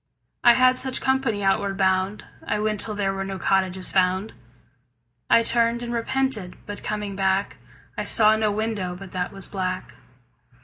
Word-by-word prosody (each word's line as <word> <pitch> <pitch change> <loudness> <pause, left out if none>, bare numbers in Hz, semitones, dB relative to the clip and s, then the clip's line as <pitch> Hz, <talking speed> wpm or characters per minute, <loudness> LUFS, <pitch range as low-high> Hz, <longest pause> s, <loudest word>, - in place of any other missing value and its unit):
I 240 -1 +7
had 255 0 +4
such 260 -1 -2
company 265 -6 0
outward 195 0 +1
bound. 190 +1 +1 0.2
I - - 0
went 215 -1 -1
till 215 +1 -1
there 195 -1 0
were 195 0 -3
no 195 0 -5
cottages 190 0 0
found. 185 +2 +1 1.0
I 230 - +6
turned 235 +1 +1
and 240 0 -4
repented, 240 -5 -1
but 205 - -7
coming 210 -2 -3
back 190 +1 0 0.4
I - - -3
saw 215 -1 +4
no 215 -1 +1
window 205 -4 -2
but 190 0 -10
that 180 -1 -3
was 195 -1 -3
black. 185 -2 -4
205 Hz, 165 wpm, -24 LUFS, 190-230 Hz, 1.0 s, I